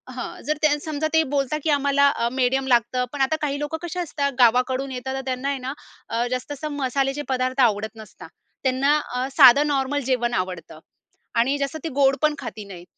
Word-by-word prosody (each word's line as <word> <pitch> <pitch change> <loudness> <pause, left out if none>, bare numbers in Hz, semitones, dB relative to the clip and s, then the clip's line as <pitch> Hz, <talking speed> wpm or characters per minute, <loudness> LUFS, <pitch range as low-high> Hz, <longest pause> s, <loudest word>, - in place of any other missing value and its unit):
हां. 250 - -6
जर 305 0 0
त्या 305 - +5
समजा 310 0 -1
ते 320 - +5
बोलता, 275 +2 0
की 315 - 0
आम्हाला 280 0 +3
अ, 235 -3 -1
मिडियम 265 +1 +1
लागतं. 245 +1 +2
पण 280 - -3
आता 270 +4 +2
काही 285 -1 -1
लोकं 295 +2 -3
कसे 350 +1 -4
असतात? 285 -4 -2
गावाकडून 255 +3 +3
येतात, 260 +1 -4
तर 270 - -3
त्यांना 260 +1 -2
आहे 280 - -1
ना 260 +2 -4 0.4
अ, 235 +2 -1
जास्त 255 +3 -3
असं 300 +2 -5
मसाल्याचे 270 +1 -1
पदार्थ 255 +1 0
आवडत 220 -1 +1
नसतात. 220 -1 -12 0.3
त्यांना 270 +3 +2 0.2
अ, 255 +1 -1
साधं 280 +2 +8
नॉर्मल 280 0 0
जेवण 240 -1 0
आवडतं 185 -4 -4 0.6
आणि 270 +5 +2
जसं 280 +3 -3
ते 325 - -3
गोड 270 -1 +4
पण 305 -1 +2
खात 215 - -7
नाही. 180 -3 -10
270 Hz, 200 wpm, -23 LUFS, 250-285 Hz, 0.6 s, साधं